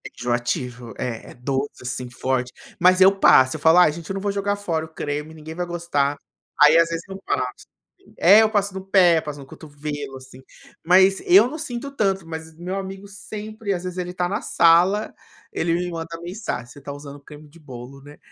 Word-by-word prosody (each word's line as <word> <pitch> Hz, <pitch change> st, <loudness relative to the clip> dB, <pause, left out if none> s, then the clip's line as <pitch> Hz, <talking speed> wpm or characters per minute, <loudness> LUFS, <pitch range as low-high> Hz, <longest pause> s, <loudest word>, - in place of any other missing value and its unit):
É -, -, -6 dB
enjoativo, 120 Hz, -1 st, -3 dB
é 120 Hz, -3 st, -5 dB
é -, -, -12 dB
doce, 135 Hz, +2 st, -4 dB
assim 125 Hz, 0 st, -4 dB
forte, 125 Hz, 0 st, -2 dB, 0.3 s
mas 185 Hz, +1 st, +4 dB
eu 190 Hz, +1 st, +7 dB
passo, 130 Hz, -8 st, +5 dB
eu -, -, -6 dB
falo: 160 Hz, +3 st, +5 dB
"Ai, 180 Hz, -4 st, +6 dB
gente 165 Hz, +1 st, -10 dB
eu -, -, -2 dB
não 195 Hz, -, -4 dB
vou 200 Hz, 0 st, -1 dB
jogar 200 Hz, 0 st, -1 dB
fora 170 Hz, -6 st, -3 dB
o -, -, -12 dB
creme, 150 Hz, +1 st, -4 dB
ninguém 160 Hz, 0 st, -9 dB
vai 175 Hz, +2 st, -3 dB
gostar." 165 Hz, -5 st, -1 dB, 0.5 s
Aí, 150 Hz, +2 st, +7 dB
às 165 Hz, 0 st, +4 dB
vezes, 165 Hz, 0 st, -4 dB
eu 195 Hz, 0 st, -9 dB
passo. 125 Hz, -1 st, -3 dB, 0.5 s
É, 200 Hz, +5 st, +7 dB
eu 220 Hz, -, +3 dB
passo 205 Hz, -2 st, 0 dB
no 190 Hz, 0 st, -6 dB
pé, 180 Hz, -4 st, +4 dB
passo 150 Hz, -2 st, -7 dB
no 140 Hz, -, -10 dB
cotovelo, 145 Hz, -1 st, -7 dB
assim, 130 Hz, 0 st, -14 dB, 0.4 s
mas 190 Hz, +2 st, +5 dB
eu 195 Hz, +6 st, +7 dB
não 310 Hz, -, -6 dB
sinto 280 Hz, -2 st, -5 dB
tanto, 195 Hz, -9 st, -1 dB
mas 160 Hz, 0 st, -8 dB
meu 180 Hz, +3 st, -5 dB
amigo 195 Hz, +1 st, -7 dB
sempre, 210 Hz, +1 st, -6 dB
às 175 Hz, -1 st, -4 dB
vezes, 180 Hz, 0 st, -6 dB
ele 180 Hz, 0 st, -3 dB
está 180 Hz, 0 st, -1 dB
na 205 Hz, +3 st, -2 dB
sala, 180 Hz, +5 st, +3 dB, 0.4 s
ele 165 Hz, 0 st, 0 dB
me 175 Hz, +1 st, -1 dB
manda 165 Hz, 0 st, -6 dB
mensagem: 175 Hz, -, -5 dB
"Você 125 Hz, +4 st, -14 dB
está 140 Hz, 0 st, -8 dB
usando 145 Hz, 0 st, -10 dB
creme 150 Hz, +1 st, -14 dB
de 160 Hz, +3 st, -19 dB
bolo, 135 Hz, -2 st, -11 dB
né?". 145 Hz, +1 st, -14 dB
165 Hz, 210 wpm, -22 LUFS, 145-190 Hz, 0.5 s, eu